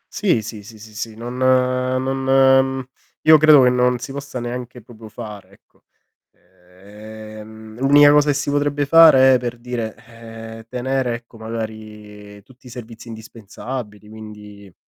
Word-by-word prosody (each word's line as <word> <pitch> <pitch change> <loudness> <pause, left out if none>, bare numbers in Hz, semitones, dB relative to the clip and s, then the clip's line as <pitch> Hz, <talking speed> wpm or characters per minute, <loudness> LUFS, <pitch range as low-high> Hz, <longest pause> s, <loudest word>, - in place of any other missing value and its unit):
Sì, 175 - +1
sì, 110 -1 -8
sì, 110 +2 -14
sì, 110 0 -14
sì, 110 0 -6
non 120 +2 -7
non, 130 0 +1 0.6
mhmm, 135 0 -4 0.4
io 155 0 +7
credo 150 -3 +6
che 125 - +4
non 125 0 +1
si 120 +2 -8
possa 140 -2 -7
neanche 120 0 -7
proprio 110 -1 -14
fare, 105 -3 -10
ecco. - - -28 0.5
Ehm, 110 +4 -14
l'unica 145 +2 +6
cosa 150 0 +4
che 145 - +1
si 145 0 -2
potrebbe 145 0 -1
fare 140 -4 +7
è 130 - +3
per 120 0 -5
dire, 120 -2 -5
ehm, 115 -1 -12
tenere 125 -1 -2
ecco 115 -1 -13
magari 105 -2 -9
tutti 130 -1 -20
i - - -11
servizi 115 -1 -11
indispensabili 110 0 -9
quindi 105 -3 -13
115 Hz, 150 wpm, -19 LUFS, 110-130 Hz, 0.6 s, io